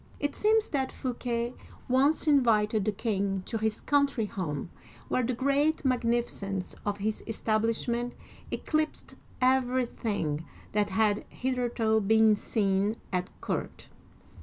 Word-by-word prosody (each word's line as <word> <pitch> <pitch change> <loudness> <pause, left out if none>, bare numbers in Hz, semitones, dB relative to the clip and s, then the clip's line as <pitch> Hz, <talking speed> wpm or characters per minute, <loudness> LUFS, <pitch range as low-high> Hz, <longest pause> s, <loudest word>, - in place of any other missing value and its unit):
It 290 -1 -1
seems 435 +1 +3
that 265 -3 -1
Fouquet 240 -1 -2 0.3
once 275 +6 +3
invited 220 -8 +3
the 215 - +2
king 200 -3 -1
to 225 - -3
his 220 0 -1
coun 285 -1 +3
try 235 -5 -2
home, 170 -6 -4 0.4
where 255 - +2
the 250 +1 -1
great 280 +4 +1
magnificence 235 -6 0
of 205 0 0
his 210 +1 -2
establish 225 +1 0
ment 240 +1 -1 0.4
eclipsed 310 0 -2 0.3
everything 245 - +1 0.3
that 205 -1 +1
had 205 +1 +2
hitherto 240 -4 0
been 220 +1 +5
seen 205 0 +1 0.2
at 180 0 0
court. - - -4
230 Hz, 125 wpm, -29 LUFS, 210-255 Hz, 0.4 s, been